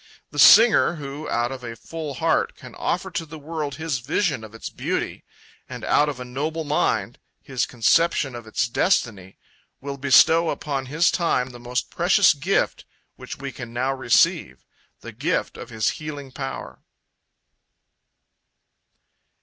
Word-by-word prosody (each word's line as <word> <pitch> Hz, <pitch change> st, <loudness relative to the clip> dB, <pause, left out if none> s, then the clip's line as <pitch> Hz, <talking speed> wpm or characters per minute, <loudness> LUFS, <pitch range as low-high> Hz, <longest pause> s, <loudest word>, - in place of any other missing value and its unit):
The -, -, -5 dB
singer 225 Hz, -6 st, +7 dB
who, 145 Hz, 0 st, -7 dB
out 120 Hz, +1 st, 0 dB
of 130 Hz, -1 st, -7 dB
a 115 Hz, -1 st, -6 dB
full 155 Hz, +3 st, -7 dB
heart, -, -, 0 dB
can -, -, -13 dB
offer -, -, -2 dB
to -, -, -3 dB
the 160 Hz, 0 st, -10 dB
world 150 Hz, -2 st, -5 dB
his 155 Hz, -3 st, -3 dB
vision 145 Hz, -, -1 dB
of 110 Hz, 0 st, -11 dB
its 115 Hz, -, -7 dB
beauty, -, -, -3 dB, 0.5 s
and -, -, -8 dB
out 150 Hz, 0 st, +3 dB
of 140 Hz, -3 st, -6 dB
a 125 Hz, -, -6 dB
noble 150 Hz, +6 st, -3 dB
mind, 150 Hz, 0 st, -1 dB, 0.2 s
his 130 Hz, -3 st, -2 dB
conception 130 Hz, +4 st, +2 dB
of 120 Hz, -2 st, -9 dB
its 115 Hz, +1 st, 0 dB
destiny, 115 Hz, -, 0 dB, 0.4 s
will 140 Hz, 0 st, -6 dB
bestow 160 Hz, +5 st, +5 dB
upon 135 Hz, -3 st, -3 dB
his 160 Hz, +6 st, +2 dB
time 130 Hz, -8 st, 0 dB
the 120 Hz, -, -12 dB
most 125 Hz, +1 st, -3 dB
precious 180 Hz, +1 st, +4 dB
gift 160 Hz, +7 st, -1 dB, 0.3 s
which -, -, -9 dB
we 140 Hz, 0 st, -6 dB
can 120 Hz, -4 st, -9 dB
now 130 Hz, +3 st, 0 dB
receive, 130 Hz, -3 st, +1 dB, 0.4 s
the -, -, -9 dB
gift -, -, -2 dB
of -, -, -9 dB
his 110 Hz, -1 st, 0 dB
healing 145 Hz, -3 st, -8 dB
power. 135 Hz, 0 st, -7 dB
140 Hz, 150 wpm, -23 LUFS, 125-160 Hz, 0.5 s, singer